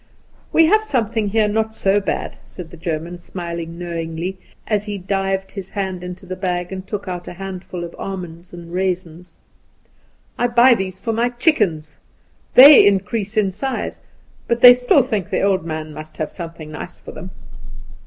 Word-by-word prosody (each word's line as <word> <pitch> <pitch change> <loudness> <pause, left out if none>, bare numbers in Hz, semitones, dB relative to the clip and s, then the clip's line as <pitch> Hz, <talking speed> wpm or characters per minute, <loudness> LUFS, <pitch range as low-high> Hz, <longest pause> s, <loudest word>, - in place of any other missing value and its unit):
"We 325 - +5
have 430 +7 +4
something 230 - -1
here 215 +1 +2
not 220 +1 -1
so 195 0 +2
bad," - - -3
said 175 -3 -10
the - - -10
German, 170 +1 -4
smiling 170 -2 -6
knowingly, 170 +1 -4 0.3
as 210 -2 0
he 205 -1 -4
dived 195 0 -2
his 195 -2 -7
hand 190 -3 -4
into 180 +2 -8
the 185 0 -5
bag 180 -1 -2
and 190 0 -6
took 205 -2 -5
out 180 -1 -5
a - - -6
handful 185 -1 -7
of 170 - -8
almonds 180 -3 -7
and 170 -1 -10
raisins; 180 -2 -3 1.0
"I 245 - +3
buy 240 +1 +6
these 190 -4 -3
for 225 - -2
my 235 +2 +1
chickens. 215 - 0 0.6
They 280 +3 +10
increase 200 +2 +1
in 200 -3 +2
size, 260 +8 -4 0.5
but 235 0 0
they 245 0 +11
still 250 +2 +3
think 215 -8 -2
the - - 0
old 195 -3 +2
man 155 -1 -5
must 155 +1 -10
have 155 - -3
something 165 -3 -8
nice 175 +3 -8
for - - -10
them. 180 - -9
190 Hz, 175 wpm, -20 LUFS, 175-215 Hz, 1.0 s, they